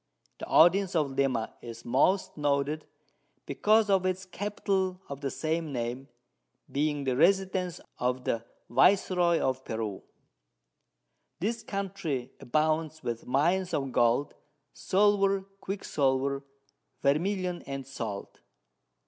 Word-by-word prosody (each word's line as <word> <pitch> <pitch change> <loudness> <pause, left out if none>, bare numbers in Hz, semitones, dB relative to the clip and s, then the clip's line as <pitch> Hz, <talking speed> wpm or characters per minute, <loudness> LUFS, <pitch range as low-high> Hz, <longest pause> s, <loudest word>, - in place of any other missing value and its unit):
The - - -6
Audience 185 +2 +5
of 150 -4 +1
Lima 135 -4 0
is 115 -1 -9
most 145 +11 +2
noted, 145 +1 0 0.6
because 210 +9 +3
of 195 -2 +3
its 185 0 -1
Capital 190 -1 -2
of 140 0 -7
the 140 - -1
same 160 +2 -2
Name, 125 +1 -3 0.6
being 145 0 0
the 130 -2 0
Residence 185 +2 +2 0.2
of 125 +1 0
the 115 -2 -1 0.2
Viceroy 175 - +4
of 130 0 -1
Peru. 110 -3 -4 1.4
This 230 +6 -1
Country 175 -10 -3
abounds 155 +3 0
with 115 -1 -4
Mines 175 +8 +2
of 135 -2 -2
Gold, 120 +4 +2 0.4
Silver, 195 0 +3 0.2
Quicksilver, 140 -8 -1 0.6
Vermilion, 180 +5 +1
and 135 -1 -5
Salt. 115 -7 -6
155 Hz, 110 wpm, -29 LUFS, 130-185 Hz, 1.4 s, Audience